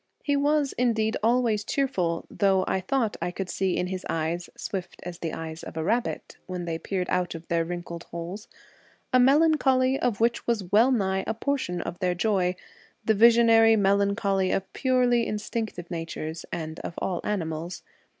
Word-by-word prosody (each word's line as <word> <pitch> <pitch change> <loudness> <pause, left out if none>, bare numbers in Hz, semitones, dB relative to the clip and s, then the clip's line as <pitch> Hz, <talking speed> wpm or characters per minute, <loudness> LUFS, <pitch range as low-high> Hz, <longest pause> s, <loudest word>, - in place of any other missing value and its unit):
He 285 - +1
was 290 0 +2
indeed 225 -3 +1
always 230 -2 +2
cheerful, 190 -11 -1
though 195 -2 +2
I 190 - 0
thought 225 +2 0
I - - -1
could 180 0 -5
see 190 -2 0
in - - 0
his 185 0 -4
eyes 165 +2 -2
(swift 185 -3 -5
as 175 0 -7
the 165 -3 -3
eyes 160 0 -6
of - - -9
a 160 - -1
rabbit, 230 +7 -2
when 180 -2 -4
they 165 -1 -3
peered 185 -1 -2
out 180 -2 0
of 165 0 -9
their 170 -1 +2
wrinkled 170 0 -6
holes) 170 +5 -7 0.7
a 255 - +6
melancholy 270 -2 +4 0.2
which 235 +2 0
was 210 -7 -1
well 230 +6 +5
nigh 190 -5 +1
a 220 - -1
portion 230 -9 -2
of 175 - -6
their 180 -2 0
joy; 185 -2 +1 0.5
the 220 - +4
visionary 225 0 +6
melancholy 200 -1 +2
of 195 - -2
purely 250 -3 +2
instinctive 210 -4 -4
natures 165 -1 -5
and 160 -1 -5
of 170 - -6
all 180 -3 -2
animals. 170 -3 -3
195 Hz, 170 wpm, -26 LUFS, 175-235 Hz, 0.7 s, a